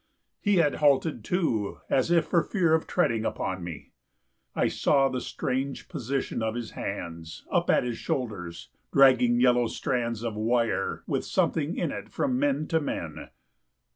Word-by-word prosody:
He 205 Hz, -1 st, +2 dB
had 160 Hz, -5 st, +3 dB
halted 145 Hz, -3 st, +2 dB
too, 115 Hz, -, -1 dB
As 130 Hz, +4 st, +1 dB
if 170 Hz, -1 st, +3 dB
for 170 Hz, -, +2 dB
fear 170 Hz, -5 st, +1 dB
of 160 Hz, -, +1 dB
treading 115 Hz, -11 st, +1 dB
upon 95 Hz, -4 st, -3 dB
me. 85 Hz, -4 st, -8 dB, 0.6 s
I -, -, +2 dB
saw 135 Hz, -2 st, +2 dB
the 130 Hz, -1 st, -3 dB
strange 135 Hz, +1 st, -3 dB
position 130 Hz, 0 st, -3 dB
of 110 Hz, 0 st, -1 dB
his 120 Hz, -2 st, -5 dB
hands 85 Hz, -4 st, -6 dB
Up -, -, +1 dB
at -, -, +4 dB
his 120 Hz, -2 st, -3 dB
shoulders, 100 Hz, -9 st, -4 dB, 0.2 s
dragging 130 Hz, -3 st, +5 dB
yellow 125 Hz, -1 st, +4 dB
strands 115 Hz, -2 st, -2 dB
Of 115 Hz, -2 st, -2 dB
wire 110 Hz, -2 st, 0 dB
with -, -, -1 dB
something 160 Hz, +2 st, 0 dB
in -, -, -1 dB
it -, -, -7 dB
from 255 Hz, -2 st, -1 dB
men 280 Hz, -, +1 dB
to 165 Hz, -, +2 dB
men. 145 Hz, -, -5 dB
125 Hz, 160 wpm, -27 LUFS, 110-155 Hz, 0.6 s, dragging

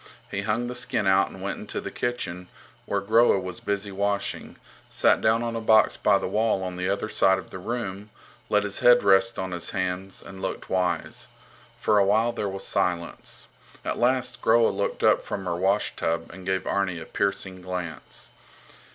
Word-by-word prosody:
He 100 Hz, -, -2 dB
hung 110 Hz, +3 st, 0 dB
the 125 Hz, -, -4 dB
skin 110 Hz, -3 st, 0 dB
out 95 Hz, 0 st, +4 dB
and 95 Hz, -, -10 dB
went 100 Hz, -, -3 dB
into -, -, -4 dB
the -, -, -6 dB
kitchen, 90 Hz, -7 st, -3 dB, 0.4 s
where -, -, 0 dB
Groa 110 Hz, 0 st, +4 dB
was 90 Hz, -1 st, -6 dB
busy 100 Hz, 0 st, -2 dB
washing, 100 Hz, +1 st, -2 dB, 0.3 s
sat -, -, +3 dB
down 115 Hz, +2 st, +3 dB
on 115 Hz, -1 st, -2 dB
a 115 Hz, -, -2 dB
box 110 Hz, -1 st, +5 dB
by 100 Hz, -, +3 dB
the -, -, -3 dB
wall 105 Hz, 0 st, +1 dB
on 90 Hz, -1 st, -4 dB
the 90 Hz, +1 st, -2 dB
other 100 Hz, +2 st, -1 dB
side 95 Hz, -3 st, +3 dB
of -, -, -9 dB
the 95 Hz, -, -7 dB
room, 105 Hz, -1 st, -4 dB, 0.4 s
let 105 Hz, 0 st, +3 dB
his 100 Hz, -1 st, -2 dB
head 120 Hz, 0 st, +6 dB
rest 95 Hz, -1 st, +4 dB
on 95 Hz, 0 st, -3 dB
his 90 Hz, -1 st, -3 dB
hands, 95 Hz, +1 st, -3 dB
and 95 Hz, 0 st, -10 dB
looked -, -, -5 dB
wise. 90 Hz, -1 st, -1 dB, 0.5 s
For 105 Hz, -1 st, +3 dB
a -, -, +5 dB
while 110 Hz, +4 st, +3 dB
there 105 Hz, -3 st, -3 dB
was 95 Hz, 0 st, -5 dB
silence. 85 Hz, -1 st, -2 dB, 0.4 s
At -, -, -2 dB
last 125 Hz, 0 st, +1 dB
Groa 115 Hz, 0 st, +5 dB
looked -, -, -2 dB
up -, -, +4 dB
from 95 Hz, -2 st, -5 dB
her 85 Hz, -, -1 dB
washtub 90 Hz, -3 st, 0 dB
and 95 Hz, 0 st, -10 dB
gave 95 Hz, 0 st, 0 dB
Arni 95 Hz, -3 st, 0 dB
a 80 Hz, -, -8 dB
piercing 95 Hz, -1 st, -2 dB
glance. 90 Hz, -3 st, -6 dB
100 Hz, 190 wpm, -26 LUFS, 95-110 Hz, 0.5 s, head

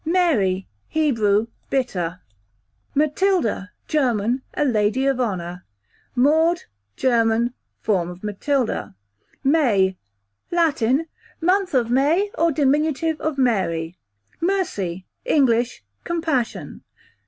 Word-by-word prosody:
Mary, 295 Hz, -, +2 dB, 0.2 s
Hebrew, 225 Hz, -9 st, +2 dB, 0.2 s
bitter. 180 Hz, -10 st, -1 dB, 0.7 s
Matilda, 300 Hz, -, +1 dB, 0.2 s
German, 245 Hz, -4 st, +1 dB
a 295 Hz, -, +1 dB
lady 220 Hz, +1 st, +1 dB
of 270 Hz, -2 st, +1 dB
honour. 180 Hz, -6 st, -3 dB, 0.5 s
Maud, 315 Hz, +7 st, +3 dB, 0.3 s
German, 235 Hz, -, +2 dB, 0.3 s
form 180 Hz, -5 st, +1 dB
of 180 Hz, +2 st, -10 dB
Matilda, 225 Hz, -, -1 dB, 0.5 s
q.v. -, -, -1 dB
May, 205 Hz, -, +3 dB, 0.5 s
Latin, 310 Hz, -4 st, +2 dB, 0.3 s
month 365 Hz, 0 st, +1 dB
of 240 Hz, -2 st, +2 dB
May, 315 Hz, +11 st, +2 dB
or 335 Hz, 0 st, +2 dB
dim. 280 Hz, -2 st, +3 dB, 0.5 s
of 310 Hz, -2 st, -2 dB
Mary, 185 Hz, -9 st, 0 dB, 0.4 s
q.v. -, -, -1 dB
Mercy, 190 Hz, -, -2 dB, 0.2 s
English, 240 Hz, -, +2 dB, 0.2 s
compassion. 320 Hz, -9 st, -2 dB
250 Hz, 95 wpm, -22 LUFS, 205-310 Hz, 0.7 s, Maud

